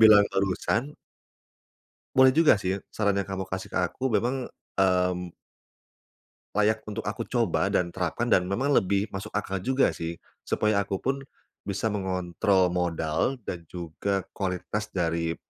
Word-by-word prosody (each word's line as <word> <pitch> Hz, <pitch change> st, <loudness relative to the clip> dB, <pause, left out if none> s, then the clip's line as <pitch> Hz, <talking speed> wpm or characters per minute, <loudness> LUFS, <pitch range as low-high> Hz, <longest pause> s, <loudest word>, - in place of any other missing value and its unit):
bilang 110 Hz, -2 st, +9 dB
barusan 100 Hz, +8 st, 0 dB, 1.2 s
boleh 130 Hz, 0 st, +7 dB
juga 155 Hz, -6 st, +6 dB
sih, 95 Hz, 0 st, -2 dB
saran 105 Hz, -2 st, +1 dB
yang 100 Hz, -, -5 dB
kamu 95 Hz, 0 st, -3 dB
kasih 95 Hz, 0 st, -5 dB
ke -, -, -8 dB, 0.2 s
aku, 130 Hz, +1 st, -1 dB
memang, 120 Hz, +4 st, 0 dB, 0.4 s
mmm 90 Hz, -1 st, 0 dB, 1.2 s
layak 110 Hz, +1 st, +3 dB
untuk 105 Hz, -, -4 dB
aku -, -, -4 dB
coba -, -, +1 dB
dan 85 Hz, -1 st, 0 dB
terapkan, 115 Hz, +7 st, -1 dB
dan 90 Hz, 0 st, +4 dB
memang 130 Hz, +9 st, +1 dB
lebih 100 Hz, -1 st, +2 dB
masuk 95 Hz, +2 st, -5 dB
akal 95 Hz, -2 st, -2 dB
juga, 130 Hz, +6 st, +2 dB
sih. 85 Hz, 0 st, -5 dB, 0.2 s
Supaya 105 Hz, -1 st, +1 dB
aku 100 Hz, 0 st, -2 dB
pun 135 Hz, +1 st, 0 dB, 0.5 s
bisa 100 Hz, +2 st, -1 dB
mengontrol 95 Hz, -1 st, +1 dB
modal 85 Hz, +6 st, 0 dB
dan 85 Hz, -3 st, -6 dB
juga 90 Hz, +3 st, -3 dB
kualitas 95 Hz, +2 st, -3 dB
dari 85 Hz, -3 st, -1 dB
95 Hz, 140 wpm, -27 LUFS, 90-110 Hz, 1.2 s, bilang